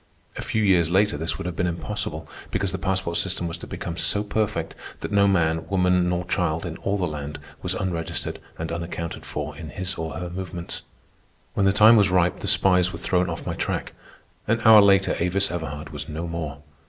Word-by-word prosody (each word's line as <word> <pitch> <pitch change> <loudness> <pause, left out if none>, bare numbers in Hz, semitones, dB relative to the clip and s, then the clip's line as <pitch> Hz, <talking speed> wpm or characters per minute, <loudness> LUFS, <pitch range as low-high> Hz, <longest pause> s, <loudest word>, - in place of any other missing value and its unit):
A - - -4
few 110 - 0
years 90 -5 +4
later 95 0 +3
this 80 +3 -2
would - - -6
have 90 -2 -3
been 90 - 0
impossible, 85 -5 -4 0.2
because - - -1
the - - -4
passport 95 -3 -1
system 90 -2 0
was 85 +1 -5
to - - -9
become 85 - -5
so 105 +3 +1
perfect 105 0 -1 0.3
that - - -4
no 100 -1 +4
man, 80 -4 +1
woman, 90 -2 +3
nor 90 0 -1
child 90 -3 0
in 85 -1 -4
all 100 +1 -1
the 95 - 0
land 75 -1 -5 0.2
was - - -1
unregistered 85 -3 -3 0.2
and 80 0 -4
unaccounted 85 0 -5
for 75 0 -4
in 80 +1 -8
his 95 +3 -2
or 80 -2 -3
her 85 +2 -5
movements. 90 -1 -5 0.7
When 100 - +2
the - - +5
time 110 +3 +7
was 100 -2 +5
ripe, 90 -1 +2
the - - -5
spies 90 -2 +4
were - - -6
thrown 90 -1 +1
off 80 - -5
my - - -2
track. - - -3 0.5
An 110 +2 +2
hour 110 -1 +10
later 100 -1 +4
Avis 95 +3 +1
Everhard 75 -3 -5
was 75 +1 -5
no 80 +3 -4
more. 80 -3 -5
90 Hz, 205 wpm, -24 LUFS, 80-95 Hz, 0.7 s, hour